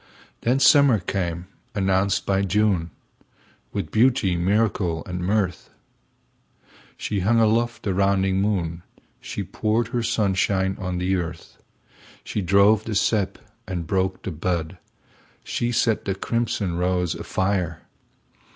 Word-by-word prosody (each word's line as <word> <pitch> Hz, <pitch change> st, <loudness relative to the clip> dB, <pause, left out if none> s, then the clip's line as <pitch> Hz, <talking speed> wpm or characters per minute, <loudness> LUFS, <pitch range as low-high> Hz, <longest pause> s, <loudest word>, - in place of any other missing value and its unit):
Then 125 Hz, +3 st, +2 dB
summer 140 Hz, -3 st, +6 dB
came, 90 Hz, -2 st, -3 dB, 0.3 s
announced 100 Hz, 0 st, +1 dB
by 95 Hz, 0 st, +1 dB
June, 100 Hz, -3 st, +1 dB, 0.8 s
With -, -, -4 dB
beauty, 115 Hz, -5 st, +3 dB
miracle 90 Hz, -2 st, 0 dB
and 90 Hz, -1 st, -5 dB
mirth. 95 Hz, -1 st, -1 dB, 1.3 s
She 105 Hz, -, -2 dB
hung 110 Hz, +5 st, +3 dB
aloft 115 Hz, +1 st, +1 dB
the 100 Hz, -, 0 dB
rounding 95 Hz, 0 st, +2 dB
moon, 90 Hz, -5 st, -1 dB, 0.4 s
She -, -, -5 dB
poured 110 Hz, +1 st, -1 dB
her 120 Hz, 0 st, -1 dB
sunshine 95 Hz, -3 st, +1 dB
on 90 Hz, -1 st, -3 dB
the 95 Hz, +2 st, 0 dB
earth, 85 Hz, -1 st, -6 dB, 0.6 s
She 105 Hz, -, -3 dB
drove 100 Hz, +3 st, +4 dB
the 110 Hz, -, -3 dB
sap 100 Hz, -1 st, +1 dB, 0.3 s
and 90 Hz, -3 st, -3 dB
broke 95 Hz, +2 st, -1 dB
the 95 Hz, -, -4 dB
bud, 85 Hz, +2 st, -3 dB, 0.6 s
She 120 Hz, 0 st, -2 dB
set 115 Hz, -2 st, +1 dB
the 95 Hz, -, -1 dB
crimson 100 Hz, -4 st, -1 dB
rose 90 Hz, -2 st, 0 dB
afire. 95 Hz, -4 st, -2 dB
95 Hz, 125 wpm, -23 LUFS, 90-110 Hz, 1.3 s, summer